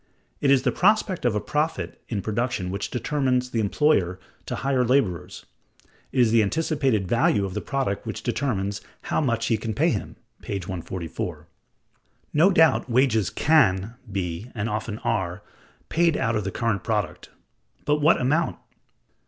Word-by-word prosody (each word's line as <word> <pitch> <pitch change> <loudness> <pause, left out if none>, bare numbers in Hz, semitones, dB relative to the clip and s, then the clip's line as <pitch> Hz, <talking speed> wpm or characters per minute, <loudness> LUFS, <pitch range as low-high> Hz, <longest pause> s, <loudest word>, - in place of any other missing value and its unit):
"It 140 - +1
is 135 -2 +5
the - - +2
prospect 200 - +2
of 120 -3 +2
a - - +2
profit 150 +8 -2
in 100 -5 -2
production 110 -4 -1
which 100 +1 -3
determines 125 -1 0
the 115 - 0
employer 100 - +2 0.3
to - - -2
hire 135 -2 +1
laborers; 120 - 0 0.7
it 130 - -1
is 115 -3 +4
the 115 -1 +5
anticipated 135 - 0
value 105 -2 +2
of 95 - -5
the - - -3
product 135 -8 -2
which - - -5
determines 100 -7 -1 0.3
how - - +3
much 115 -5 0
he 115 - +2
can 110 0 -4
pay - - +3
him" - - -4 0.3
(p. 100 - -4
144). 90 -2 -5 0.9
No 160 +6 +5
doubt 160 -6 +4
wages 120 -4 +3
can 110 -10 +3 0.2
be 95 +3 -3
(and 105 0 -2
often 105 0 -3
are) 90 +2 -1 0.4
paid 170 -2 +2
out 115 0 0
of 105 -2 -1
the 95 - -2
current 115 -3 -1
product; 100 -6 -2 0.6
but 150 0 +2
what 155 +3 +5
amount? 150 +6 +1
115 Hz, 160 wpm, -25 LUFS, 100-140 Hz, 0.9 s, is